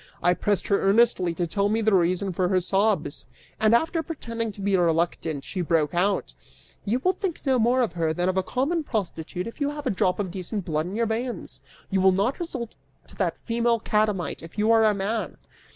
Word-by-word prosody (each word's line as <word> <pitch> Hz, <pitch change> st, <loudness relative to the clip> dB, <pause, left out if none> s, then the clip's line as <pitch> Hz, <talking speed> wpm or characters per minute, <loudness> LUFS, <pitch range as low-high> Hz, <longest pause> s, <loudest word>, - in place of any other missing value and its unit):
I 175 Hz, +1 st, +5 dB
pressed 205 Hz, +1 st, 0 dB
her 200 Hz, -, +3 dB
earnestly 195 Hz, -4 st, +3 dB
to 175 Hz, -, -1 dB
tell 200 Hz, +4 st, 0 dB
me 220 Hz, +2 st, +1 dB
the 220 Hz, -1 st, +2 dB
reason 185 Hz, +1 st, +2 dB
for 180 Hz, +1 st, +1 dB
her 185 Hz, -1 st, +3 dB
sobs) 190 Hz, -4 st, 0 dB, 0.3 s
{and 220 Hz, +1 st, +5 dB
after 325 Hz, +6 st, +1 dB
pretending 230 Hz, -8 st, -4 dB
to 200 Hz, -, -14 dB
be 200 Hz, 0 st, +1 dB
reluctant 165 Hz, -4 st, 0 dB
she 185 Hz, -, -4 dB
broke 160 Hz, -3 st, +1 dB
out:} 190 Hz, +3 st, 0 dB, 0.5 s
"You 220 Hz, +4 st, +1 dB
will 370 Hz, -, +4 dB
think 380 Hz, -5 st, -4 dB
no 260 Hz, -2 st, +3 dB
more 245 Hz, +3 st, +3 dB
of 230 Hz, -9 st, 0 dB
her 165 Hz, -2 st, 0 dB
than 175 Hz, +3 st, -1 dB
of 185 Hz, -, +1 dB
a 190 Hz, -, +3 dB
common 280 Hz, -, -1 dB
prostitute 180 Hz, -, -3 dB
if 230 Hz, +6 st, -9 dB
you 285 Hz, -, +2 dB
have 295 Hz, 0 st, -6 dB
a -, -, +1 dB
drop 185 Hz, -1 st, +1 dB
of 195 Hz, -4 st, -3 dB
decent 190 Hz, +2 st, -4 dB
blood 155 Hz, 0 st, -1 dB
in 190 Hz, -, -5 dB
your 230 Hz, +1 st, +1 dB
veins! 230 Hz, +2 st, -3 dB, 0.3 s
You 190 Hz, -1 st, +2 dB
will 190 Hz, 0 st, +5 dB
not 205 Hz, -, 0 dB
resort 260 Hz, -10 st, -5 dB, 0.3 s
to -, -, -13 dB
that -, -, 0 dB
female 235 Hz, 0 st, +1 dB
catamite, 210 Hz, -7 st, 0 dB
if 165 Hz, +5 st, -12 dB
you 215 Hz, +2 st, +3 dB
are 225 Hz, -1 st, +5 dB
a 210 Hz, -1 st, +3 dB
man!" 205 Hz, +3 st, -2 dB
200 Hz, 215 wpm, -25 LUFS, 180-230 Hz, 0.5 s, I